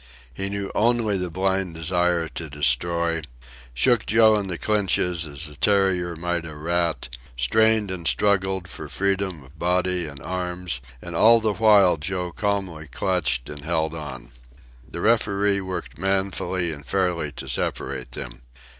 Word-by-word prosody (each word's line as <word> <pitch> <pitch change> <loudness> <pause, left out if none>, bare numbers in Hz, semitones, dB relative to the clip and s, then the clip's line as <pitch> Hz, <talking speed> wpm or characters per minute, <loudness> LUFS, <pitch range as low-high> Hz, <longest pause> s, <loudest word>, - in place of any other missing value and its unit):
He 95 +10 -3
knew 100 0 -4
only 115 -1 +2
the 90 -1 -1
blind 95 0 -1
desire 85 0 +1
to 80 -2 -6
destroy, 80 +5 +1 0.5
shook 115 - +3
Joe 110 0 +5
in 100 -2 0
the 90 -2 -3
clinches 90 -5 +1
as 75 +2 -5
a 75 - -11
terrier 90 -1 +2
might 85 +1 -2
a 80 -2 -8
rat, 85 +2 -1 0.3
strained 110 - +3
and 85 -3 -3
struggled 95 -2 +1
for - - -8
freedom 95 -5 -1
of 70 +4 -19
body 90 -1 +1
and 70 -2 -9
arms, 90 -5 -3 0.2
and 85 - -7
all 115 +6 +6
the 110 -2 0
while 100 -5 +5
Joe 90 +3 -3
calmly 95 -7 -2
clutched 70 -5 -1
and 75 -1 -8
held 80 0 -1
on. 75 -6 -8 0.6
The 85 - -6
referee 100 -3 +2
worked 95 -4 -6
manfully 95 -2 0
and 70 -1 -9
fairly 90 -4 -1
to - - -7
separate 65 -2 -2
them. - - -7
90 Hz, 150 wpm, -24 LUFS, 80-100 Hz, 0.6 s, all